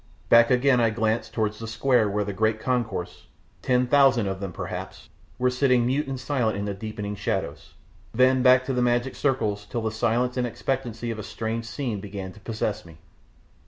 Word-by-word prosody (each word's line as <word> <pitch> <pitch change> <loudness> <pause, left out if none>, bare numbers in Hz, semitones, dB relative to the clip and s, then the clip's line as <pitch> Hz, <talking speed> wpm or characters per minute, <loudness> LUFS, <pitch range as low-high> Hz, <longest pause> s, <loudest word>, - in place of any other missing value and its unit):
Back 115 0 +7
again, 125 0 +4
I 115 - +4
glanced 110 +1 -1
towards 105 -1 -2
the 115 - -6
square 115 0 +2
where 105 +1 0
the 100 0 -4
great 110 +2 +1
concourse 100 -8 -3 0.3
ten 125 -1 +2
thousand 135 -4 +4
of 95 -1 -3
them, 100 -2 -5
perhaps - - -7 0.3
were 125 0 +2
sitting 125 -2 +2
mute 135 +4 0
and 135 -1 -4
silent 125 -5 -1
in 100 - -3
the 100 - -2
deepening 105 0 -5
shadows, 100 - -4 0.4
then 130 +2 +3
back 130 0 +5
to 135 - -2
the 125 - 0
magic 120 +1 +1
circles, 110 -7 0
till 115 - -3
the 110 - -1
silence 120 +3 0
and 125 -1 +1
expectancy 120 -2 -3
of 110 - -5
a - - -5
strange 115 +2 -4
scene 115 -3 -3
began 95 -1 -7
to - - -15
possess 110 -1 -3
me. 80 -2 -15
115 Hz, 195 wpm, -25 LUFS, 105-125 Hz, 0.4 s, Back